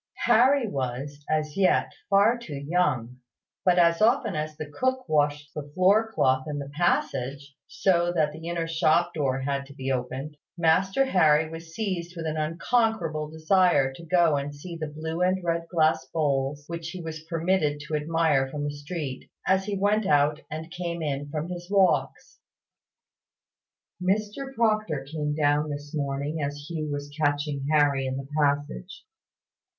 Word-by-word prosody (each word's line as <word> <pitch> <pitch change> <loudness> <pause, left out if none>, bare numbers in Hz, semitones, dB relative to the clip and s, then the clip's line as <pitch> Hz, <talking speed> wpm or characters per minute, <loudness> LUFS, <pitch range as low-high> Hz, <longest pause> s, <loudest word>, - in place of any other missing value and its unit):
Harry 255 +3 +5
was, 140 - -4
as 155 -1 0
yet, 195 -2 +3 0.2
far 200 +4 +5
too 235 -12 -8
young; 140 -5 0 0.5
but, 180 -1 +4
as 170 0 +4
often 230 -1 +3
as 155 0 -3
the 155 - -4
cook 255 - -2
washed 145 -1 0
the 145 -1 -6
floor 205 +5 +4
cloth 130 -8 +2
in 150 -1 -3
the 140 -1 -5
passage, 140 -3 -1
so 175 -2 +2
that 155 -3 +1
the 160 +2 -9
inner 170 -1 -1
shop 165 +1 +2
door 135 -3 0
had 140 +1 -1
to 140 0 -14
be 135 -1 -3
opened, 130 +3 -3 0.2
Master 190 +9 +3
Harry 160 - +4
was 165 0 -9
seized 180 -5 -3
with 165 -1 -5
an 155 -1 -2
unconquerable 165 -1 0
desire 160 -4 +3
to 150 - -11
go 170 -3 +3
and 140 +1 -4
see 170 +4 -8
the 160 -1 -4
blue 160 +3 -5
and 185 0 +1
red 170 -1 -1
glass 160 -1 +2
bowls 145 -2 0
which 170 0 -5
he 180 +1 -7
was 160 -1 -6
permitted 165 -3 0
to 150 +1 -8
admire 150 -3 +1
from 145 +1 -4
the 145 0 -2
street, 145 -2 -6 0.2
as 190 0 +2
he 205 -1 -2
went 205 +1 +2
out 145 +1 +3
and 160 +2 -6
came 170 -1 -4
in 145 -1 -3
from 155 +2 -3
his 175 0 -7
walks. 195 -2 +1 1.6
Mr 210 +8 -1
Proctor 215 - +1
came 150 0 -2
down 150 0 +2
this 145 +1 -6
morning 145 +1 -2
as 145 0 -4
Hugh 155 -2 -3
was 145 0 -5
catching 145 -1 0
Harry 145 -3 +3
in 130 0 -2
the 135 0 -6
passage. 145 +5 -1
155 Hz, 165 wpm, -26 LUFS, 145-180 Hz, 1.6 s, Harry